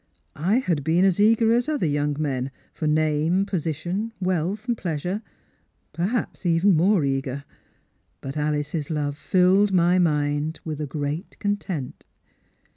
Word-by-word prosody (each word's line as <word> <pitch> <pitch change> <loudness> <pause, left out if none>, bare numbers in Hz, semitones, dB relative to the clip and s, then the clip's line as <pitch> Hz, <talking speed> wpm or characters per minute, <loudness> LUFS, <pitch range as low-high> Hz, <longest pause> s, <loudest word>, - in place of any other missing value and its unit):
I 180 +9 +1
had 170 - 0
been 170 +5 +3
as 190 -1 +2
eager 225 +2 +4
as 240 +4 +1
other 295 - 0
young 145 -1 0
men 135 -4 -1 0.2
for 155 - -3
name, 155 +4 +2
position, 180 +4 -2
wealth, 185 +3 -1
jjleasure 185 - -2 0.4
— - - -45
per 170 +2 0
haps 235 -1 -3
even 175 +3 +3
more 175 0 +3
eager. 135 0 -2 0.8
But 135 +1 -7
Alice's 150 0 -2
love 145 -3 -1
filled 190 +5 +3
my 180 0 +4
mind 150 -1 0
with 155 -2 -4
a 150 - -2
great 150 +5 -4
content. 200 -9 -3
165 Hz, 140 wpm, -24 LUFS, 150-195 Hz, 0.8 s, eager